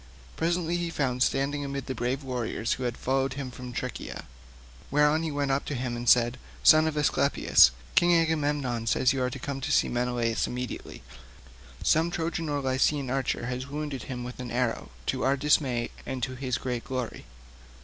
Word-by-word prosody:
Presently 170 +1 0
he 175 -1 -2
found 130 -6 -1
standing 140 +2 +1
amid 140 -1 -4
the 130 - -3
brave 130 +3 -2
warriors 120 -3 -2
who 130 - -5
had 120 -1 -2
followed 135 +1 0
him 135 -2 -5
from 125 0 -8
Tricca; - - -5 0.7
thereon 150 +2 +4
he 165 - -2
went 145 -2 -1
up 135 +1 +1
to 145 - -3
him 120 -1 -2
and 120 0 0
said, 120 +1 +4 0.2
"Son 155 0 +7
of 155 -1 -2
Aesculapius, 145 -1 +5 0.2
King 175 0 +5
Agamemnon 145 -7 0
says 125 +3 +3
you 135 - -1
are 125 - +1
to 125 - -6
come 135 +2 -4
and 135 - -4
see - - +2
Menelaus 120 -1 0
immediately. 125 - -6 0.8
Some 160 +2 +3
Trojan 165 -1 -2
or 145 -1 -1
Lycian 130 0 +1
archer 130 -3 -1
has 125 +1 -4
wounded 145 -2 -4
him 125 -2 -4
with 125 +1 -8
an 125 -1 -5
arrow 120 -1 -1 0.2
to - - -1
our 135 +1 +2
dismay 130 -4 +1
and 130 -1 -4
to 130 - -1
his 130 -1 -2
own - - -13
great 125 -2 -2
glory." 125 - -4
130 Hz, 190 wpm, -28 LUFS, 125-145 Hz, 0.8 s, Son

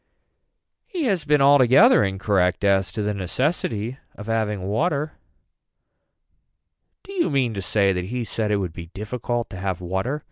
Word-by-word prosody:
He 355 -4 -3
has 195 - 0
been 150 -1 +3
altogether 140 - +6
incorrect 95 -1 0
as 95 -2 +2
to 105 - -3
the 105 0 -1
necessity 115 - -2 0.2
of 105 - -9
having 105 -3 -1
water. 145 - -1 1.9
Do 395 - -12
you 360 - +1
mean 130 -5 0
to 100 - -4
say 100 0 +2
that 90 -1 -3
he 120 +5 -3
said 110 -1 -2
it 105 - +2
would 90 -5 -3
be 85 -1 -9
difficult 120 +5 -4
to - - -7
have 95 -1 -3
water. 95 +11 -2
110 Hz, 155 wpm, -23 LUFS, 95-135 Hz, 1.9 s, altogether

